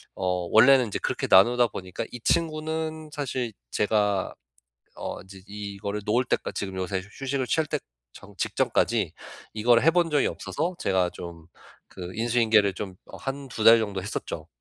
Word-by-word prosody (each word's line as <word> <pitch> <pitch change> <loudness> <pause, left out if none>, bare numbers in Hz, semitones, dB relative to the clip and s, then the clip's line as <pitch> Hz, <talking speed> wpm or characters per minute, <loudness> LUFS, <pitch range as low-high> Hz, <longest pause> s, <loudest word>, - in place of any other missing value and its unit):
어 90 -2 -1
원래는 125 +3 +7
인제 100 - -3
그렇게 - - -2
나누다 120 +5 +6
보니까 95 -3 -6
이 125 - -7
친구는 160 0 -1
사실 130 -5 -3 0.2
제가 105 -2 +1 0.6
어 - - -5
이제 95 0 -14
이 100 -1 -7
이거를 100 +1 -4
놓을 120 +4 +2
때까 - - -1
지금 95 -2 -4
요새 95 +1 -2
휴 95 - -14 0.2
휴식을 130 -1 -1
취할 160 +3 +1
때 - - -2 0.3
전 - - -14
직전까지 - - +1 0.4
이거를 115 +3 +4
해 165 - +6
본 175 -2 +2
적이 145 -2 +2
없어서 170 +5 -3
제가 95 -2 +1
좀 85 -2 -10 0.5
그 90 -1 -7
인수인계를 110 -3 +3
좀 95 -1 -6
어 - - -11
1-2 135 -4 -5
달 115 +1 +9
정도 100 -3 -3
했었죠. 105 - -5
110 Hz, 315 characters per minute, -26 LUFS, 95-135 Hz, 0.6 s, 달